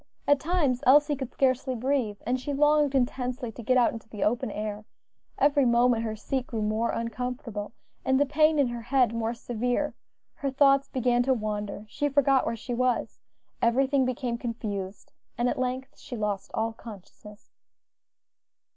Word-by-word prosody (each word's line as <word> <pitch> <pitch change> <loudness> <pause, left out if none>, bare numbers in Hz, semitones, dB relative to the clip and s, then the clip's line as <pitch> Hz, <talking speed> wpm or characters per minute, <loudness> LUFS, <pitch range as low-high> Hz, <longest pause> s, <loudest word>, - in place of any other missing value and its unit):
At 285 -1 +5
times 295 -7 0
Elsie 290 +2 +6
could 265 -2 -6
scarcely 260 0 +1
breathe, 245 -4 -1
and 250 +3 0
she 285 +3 -4
longed 295 0 +3
intensely 250 -1 -1
to 235 - -10
get 255 +3 +2
out 245 - +3
into 225 -1 -10
the 210 -3 -4
open 230 +1 0
air; 210 0 -4 0.5
every 285 0 +3
moment 240 -1 +3
her 220 -1 -3
seat 255 +4 -3
grew 220 -2 -3
more 215 +2 0
uncomfortable 230 -2 -4 0.3
and 265 0 +2
the 285 - +4
pain 305 +2 +3
in 280 -4 +3
her 240 -1 -5
head 245 -1 +2
more 230 0 -2
severe: 245 +5 -2 0.4
her 275 - -3
thoughts 275 0 +4
began 245 -1 +1
to 260 +1 +2
wander, 210 -2 -4
she 290 +7 -1
forgot 275 -1 +3
where - - -1
she 245 +2 -6
was, 250 0 0 0.4
everything 265 +3 +3
became 250 -2 -2
confused, 205 -5 -5 0.3
and 240 +1 +1
at - - -1
length 255 +1 -3
she 245 - -7
lost 205 -2 -2
all 225 +1 -1
consciousness. 210 -1 -13
245 Hz, 165 wpm, -27 LUFS, 225-270 Hz, 0.5 s, Elsie